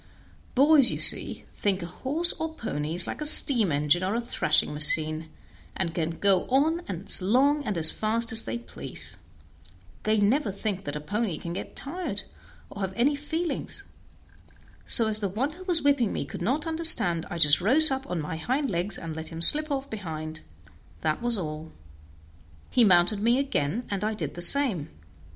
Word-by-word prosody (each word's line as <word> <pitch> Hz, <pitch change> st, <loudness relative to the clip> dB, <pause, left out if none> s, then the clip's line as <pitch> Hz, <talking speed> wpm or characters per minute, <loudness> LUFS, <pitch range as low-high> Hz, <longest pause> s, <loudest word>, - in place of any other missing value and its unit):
Boys, 280 Hz, -1 st, +6 dB
you -, -, -3 dB
see, -, -, +6 dB
think 195 Hz, -3 st, -2 dB
a -, -, -5 dB
horse 275 Hz, -, -1 dB
or 320 Hz, 0 st, -5 dB
pony 155 Hz, -, -5 dB
is 175 Hz, 0 st, +4 dB
like -, -, -7 dB
a -, -, -2 dB
steam 240 Hz, -, +5 dB
engine 150 Hz, +4 st, 0 dB
or 190 Hz, +4 st, -2 dB
a -, -, -1 dB
thrashing 235 Hz, -9 st, -1 dB
machine, 155 Hz, +1 st, +3 dB, 0.5 s
and 170 Hz, -4 st, -3 dB
can 165 Hz, -1 st, -4 dB
go 195 Hz, -2 st, +2 dB
on 300 Hz, +6 st, +1 dB
as 185 Hz, +1 st, +1 dB
long 275 Hz, +9 st, +1 dB
and 210 Hz, -5 st, -3 dB
as 160 Hz, -1 st, +4 dB
fast 230 Hz, +2 st, -1 dB
as 225 Hz, 0 st, +2 dB
they 115 Hz, -, -5 dB
please; 120 Hz, -, -4 dB, 0.8 s
they 215 Hz, 0 st, 0 dB
never 215 Hz, +3 st, 0 dB
think 200 Hz, -1 st, -5 dB
that 145 Hz, -, -6 dB
a -, -, -4 dB
pony 205 Hz, +2 st, -4 dB
can 170 Hz, +2 st, -7 dB
get -, -, -8 dB
tired, 345 Hz, +7 st, -5 dB, 0.5 s
or 200 Hz, -, -9 dB
have 190 Hz, -1 st, -4 dB
any 270 Hz, +6 st, +1 dB
feelings; 320 Hz, +4 st, -5 dB, 1.0 s
so 230 Hz, -, +5 dB
as 215 Hz, -1 st, +3 dB
the 200 Hz, -2 st, -3 dB
one 245 Hz, +10 st, -3 dB
who 355 Hz, +4 st, -13 dB
was 350 Hz, -5 st, 0 dB
whipping 280 Hz, -7 st, +1 dB
me -, -, -4 dB
could -, -, -10 dB
not 260 Hz, -, -1 dB
understand 290 Hz, -, +3 dB
I 175 Hz, -, -6 dB
just 150 Hz, 0 st, +4 dB
rose 280 Hz, -, +6 dB
up 265 Hz, 0 st, -5 dB
on 180 Hz, -, -3 dB
my 160 Hz, +1 st, -6 dB
hind 260 Hz, -, -3 dB
legs 180 Hz, +4 st, -3 dB
and 165 Hz, -2 st, -8 dB
let 160 Hz, 0 st, -7 dB
him 165 Hz, 0 st, -6 dB
slip 305 Hz, -, +2 dB
off 275 Hz, -1 st, -4 dB
behind 160 Hz, -, -8 dB, 0.6 s
that 155 Hz, +4 st, -2 dB
was 240 Hz, -1 st, 0 dB
all. 155 Hz, -3 st, -7 dB, 1.0 s
He 245 Hz, -, +3 dB
mounted 185 Hz, +1 st, +3 dB
me 235 Hz, +4 st, +1 dB
again, 235 Hz, -, -3 dB
and 200 Hz, 0 st, -4 dB
I 215 Hz, +1 st, -2 dB
did -, -, -6 dB
the 175 Hz, -, -9 dB
same. 205 Hz, -, +2 dB
210 Hz, 185 wpm, -25 LUFS, 170-270 Hz, 1.0 s, Boys